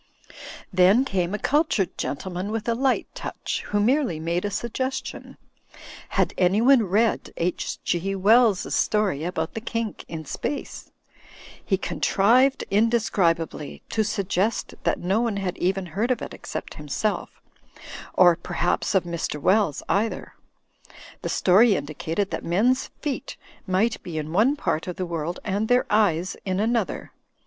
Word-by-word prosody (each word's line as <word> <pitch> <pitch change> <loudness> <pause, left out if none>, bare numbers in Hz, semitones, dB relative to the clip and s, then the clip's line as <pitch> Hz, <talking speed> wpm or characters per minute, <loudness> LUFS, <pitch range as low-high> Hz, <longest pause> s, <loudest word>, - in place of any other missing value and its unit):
Then 190 +8 +5
came 185 -4 -1
a - - -2
cultured 290 - +1
gentleman 180 +6 -4
with 225 +1 -3
a 235 - +2
light 260 +2 +1
touch, - - -4
who 205 - 0
merely 240 - +2
made 170 +4 -1
a - - 0
suggestion. 260 +5 -4 0.7
Had - - +1
anyone 225 +8 +5
read 215 +5 +1
H. 175 +1 -2
G. 190 +3 -1
Wells's 215 +1 +4
story 205 -9 +1
about 160 -2 -3
the 225 - -5
kink 230 -3 -3
in 160 -1 -6
space? 285 - -5 0.7
He 190 - +1
con - - -5
trived, 255 +7 +4
indescribably, 195 -8 +1
to 220 - +1
suggest 205 0 -1
that - - +2
no 195 +6 +1
one 230 -4 -1
had 190 -2 -2
even 190 +1 0
heard 205 +8 -2
of 255 - +1
it - - -7
except - - -6
himself; - - -2 0.8
or, 175 -2 +6
perhaps, 175 +3 -1
of 190 - +4
Mr. 170 -3 -3
Wells 190 -1 +2
either. 220 +3 -1 0.9
The - - -3
story 200 +4 +5
indicated 160 +6 -3
that - - -3
men's 235 +10 +2
feet 290 -3 -4 0.3
might 200 +5 +1
be 170 -3 -6
in 155 +1 -4
one 230 +10 +4
part 160 - -2
of 180 - -4
the 185 - -3
world 170 0 -3
and 205 +2 -1
their 245 +1 +3
eyes 190 -4 +2
in 190 -1 -1
another. 225 -1 -1
200 Hz, 145 wpm, -24 LUFS, 175-230 Hz, 0.9 s, or